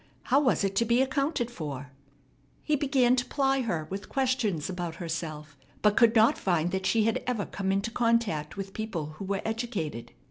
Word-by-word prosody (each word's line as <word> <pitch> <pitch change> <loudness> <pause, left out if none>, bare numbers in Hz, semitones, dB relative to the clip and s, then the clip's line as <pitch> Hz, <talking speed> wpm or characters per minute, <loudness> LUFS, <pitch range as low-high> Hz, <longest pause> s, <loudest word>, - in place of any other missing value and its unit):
How 275 - +3
was 255 - +2
it 195 0 0
to 235 - +4
be 235 +2 +2
accounted 270 -2 -1
for? 145 - -6 0.7
He 305 - +2
began 265 -3 +3
to 245 - +1
ply 270 -1 +1
her 170 -10 -2
with 200 +1 -5
questions 250 - 0
about 175 -3 -4
herself, 160 -3 -5 0.3
but 210 -1 +4
could 235 -1 +5
not 220 +1 +5
find 175 -2 +1
that 190 0 -1
she 225 -1 +3
had 225 +1 +1
ever 230 -5 0
come 195 -1 -2
into 200 +4 0
contact 230 -10 0
with 195 0 -5
people 195 -9 -4
who 195 - -4
were 195 0 -2
educated. 200 - -3
205 Hz, 185 wpm, -28 LUFS, 170-240 Hz, 0.7 s, could